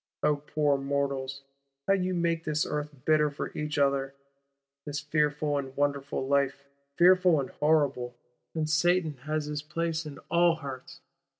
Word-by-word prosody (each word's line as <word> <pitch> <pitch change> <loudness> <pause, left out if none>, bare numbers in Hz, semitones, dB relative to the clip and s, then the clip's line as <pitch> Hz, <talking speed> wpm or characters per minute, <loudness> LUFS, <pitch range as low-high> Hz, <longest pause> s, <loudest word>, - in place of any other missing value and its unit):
O 150 -1 +3
poor 145 -1 0
mortals, 140 -1 -2 0.4
how 195 - +5
ye 185 -1 0
make 170 -2 0
this 155 -1 0
Earth 150 0 -3 0.2
bitter 155 -1 +4
for 145 - -6
each 150 -1 -3
other; 140 -1 +1 0.7
this 145 0 -4
fearful 150 -1 0
and 135 -1 -7
wonderful 140 -2 -1
Life 140 0 +1 0.3
fearful 180 -2 +6
and 135 - -4
horrible; 140 -5 +1 0.4
and 155 -1 0
Satan 160 -1 +2
has 155 -1 -1
his 150 0 -3
place 165 +1 -2
in 145 - -8
all 170 0 +4
hearts! 135 -5 -8
150 Hz, 145 wpm, -28 LUFS, 140-160 Hz, 0.7 s, fearful